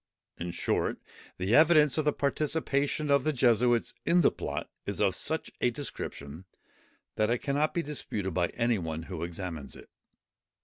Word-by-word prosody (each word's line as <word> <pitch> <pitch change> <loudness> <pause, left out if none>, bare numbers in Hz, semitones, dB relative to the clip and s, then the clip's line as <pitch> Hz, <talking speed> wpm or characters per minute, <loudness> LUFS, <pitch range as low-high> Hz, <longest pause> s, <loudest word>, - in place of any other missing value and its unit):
In 85 - -3
short, 85 0 -1 0.4
the 95 +4 -1
evidence 155 -2 +6
of 155 - 0
the 150 - +4
participation 145 0 0
of 140 -2 +4
the 155 - +2
Jesuits 120 -2 +3
in 175 +1 +4
the - - +5
plot - - -4 0.2
is 100 - -3
of 100 -3 +3
such 160 +11 -3
a 125 - +4
description, 90 - -7 0.7
that 110 0 +2
it 120 - +2
cannot 145 +4 0
be 170 - +1
disputed 105 - -4
by 85 0 +2
any 120 -2 +1
one 80 -1 -4
who 85 -1 -6
examines 85 -4 -5
it. - - -14
120 Hz, 165 wpm, -29 LUFS, 90-150 Hz, 0.7 s, evidence